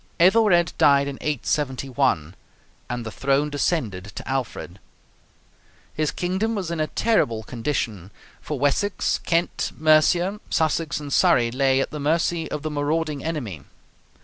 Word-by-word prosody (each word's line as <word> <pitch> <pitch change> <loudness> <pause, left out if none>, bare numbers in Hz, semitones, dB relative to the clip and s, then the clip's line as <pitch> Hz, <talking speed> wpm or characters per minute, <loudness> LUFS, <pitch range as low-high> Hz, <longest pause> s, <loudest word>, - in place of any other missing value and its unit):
Ethelred 180 -2 +4
died 140 -1 +5
in 140 -1 -6
871, 135 - -1 0.6
and 120 -1 -4
the 110 - -5
throne 140 +4 0
descended 130 - -1
to - - -7
Alfred. 125 -8 -4 1.1
His 155 -1 0
kingdom 190 +6 -1
was 185 -5 -3
in 170 - -3
a 155 - +1
terrible 115 - +1
condition, 115 - -3 0.3
for 150 - -4
Wessex, 145 +9 0
Kent, 170 +1 -1
Mercia, 165 +6 +3
Sussex, 160 -1 0
and 145 -2 -6
Surrey 125 -11 +4
lay 135 +1 +2
at - - -3
the 150 - -5
mercy 165 +2 0
of 150 - -4
the 155 - -3
marauding 150 0 -1
enemy. 125 - -4
150 Hz, 135 wpm, -23 LUFS, 130-165 Hz, 1.1 s, died